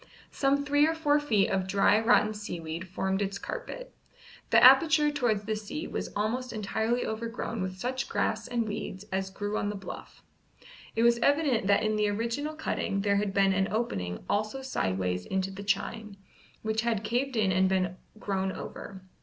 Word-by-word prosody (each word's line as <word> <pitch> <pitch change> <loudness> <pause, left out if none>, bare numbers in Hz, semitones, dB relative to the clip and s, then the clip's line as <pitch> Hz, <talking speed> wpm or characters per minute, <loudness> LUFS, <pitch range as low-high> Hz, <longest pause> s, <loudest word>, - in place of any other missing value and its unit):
Some 280 +1 +1
three 290 +1 +4
or 325 - 0
four 295 -2 +2
feet 220 -9 +2
of 190 -1 0
dry 200 +2 +4
rotten 220 -2 +4
seaweed 170 -4 -6
formed 190 +2 -1
its 200 0 -2
carpet. - - -7 0.6
The - - +5
aperture 295 +3 +7
towards 240 -8 0
the 215 +1 -2
sea 220 +10 -5
was - - -4
almost 240 +5 -1
entirely 220 +3 -1
overgrown 230 0 -4
with 185 0 -4
such 255 +5 -3
grass 220 -1 -1
and 235 -2 -1
weeds 205 -1 -5
as 190 0 -1
grew 205 +2 -3
on 205 - -1
the 205 - -4
bluff. 195 - -9 0.7
It 225 - +2
was 235 0 +4
evident 280 -6 +2
that 200 - +4
in 215 0 +1
the 210 -1 +2
original 235 +9 -2
cutting 200 -9 -2
there 200 0 +2
had 205 -1 0
been 195 -1 +3
an 190 0 +1
opening 95 - -2
also 215 +6 -1
sideways 95 - -1
into 190 0 -1
the 195 +1 -8
chine, 205 0 -2 0.5
which 220 0 0
had 230 -3 -1
caved 245 +5 -1
in 210 -4 +2
and 185 +1 +3
been 185 -1 0 0.2
grown 190 -2 -1
over. 190 0 -8
215 Hz, 180 wpm, -29 LUFS, 195-245 Hz, 0.7 s, aperture